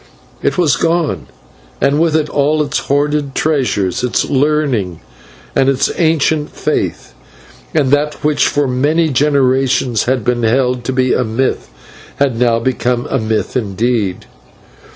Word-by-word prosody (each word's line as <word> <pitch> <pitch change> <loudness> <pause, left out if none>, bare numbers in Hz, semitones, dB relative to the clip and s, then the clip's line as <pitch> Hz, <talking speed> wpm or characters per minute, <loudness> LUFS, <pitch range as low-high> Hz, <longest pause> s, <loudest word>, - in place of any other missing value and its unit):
It - - 0
was 155 -10 +2
gone, 165 0 0 0.5
and 140 +2 +2
with 165 -1 +2
it 155 -1 +1
all 150 +2 +1
its 145 0 -2
hoarded 145 0 -1
treasures, 125 - 0
its 125 - 0
learning 135 - 0 0.6
and 135 - +3
its 135 -1 +1
ancient 160 -2 +1
faith, - - -3 0.6
and 140 -4 +2
that 150 +1 0
which 150 0 +2
for 145 -1 0
many 150 +6 +1
generations 135 -3 +1
had 130 -2 0
been 120 -1 0
held 125 +2 +1
to 130 - -1
be 130 -1 +1
a 125 - +1
myth 120 +3 -2 0.5
had 140 -4 +1
now 120 -2 +3
become 120 0 -1
a 135 - +1
myth 110 -1 -2
indeed. 110 -3 -1
135 Hz, 140 wpm, -15 LUFS, 120-150 Hz, 0.6 s, and